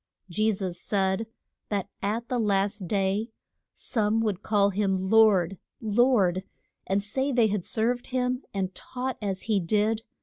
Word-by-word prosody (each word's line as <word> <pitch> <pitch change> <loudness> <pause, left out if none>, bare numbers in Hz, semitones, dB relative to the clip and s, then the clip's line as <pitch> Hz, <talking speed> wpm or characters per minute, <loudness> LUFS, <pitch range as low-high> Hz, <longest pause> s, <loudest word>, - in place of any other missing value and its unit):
Je 215 +5 +2
sus 185 -4 -4
said 195 +2 0 0.4
that 200 -3 -1
at 220 +4 -2
the 250 - -1
last 200 -2 +1
day 200 +4 0 0.4
some 220 -1 0
would 210 -4 -1
call 200 -2 +2
him 190 -1 0
Lord, 195 -5 +5 0.2
Lord, 210 -5 +3 0.4
and 195 +1 +1
say 265 +7 -1
they 235 -4 +3
had 200 -3 -1
served 240 +5 -1
him 250 0 -1
and 190 -1 -2
taught 255 +4 -5
as 195 -2 -2
he 215 -3 +1
did. 210 +5 +1
210 Hz, 145 wpm, -27 LUFS, 195-225 Hz, 0.4 s, Lord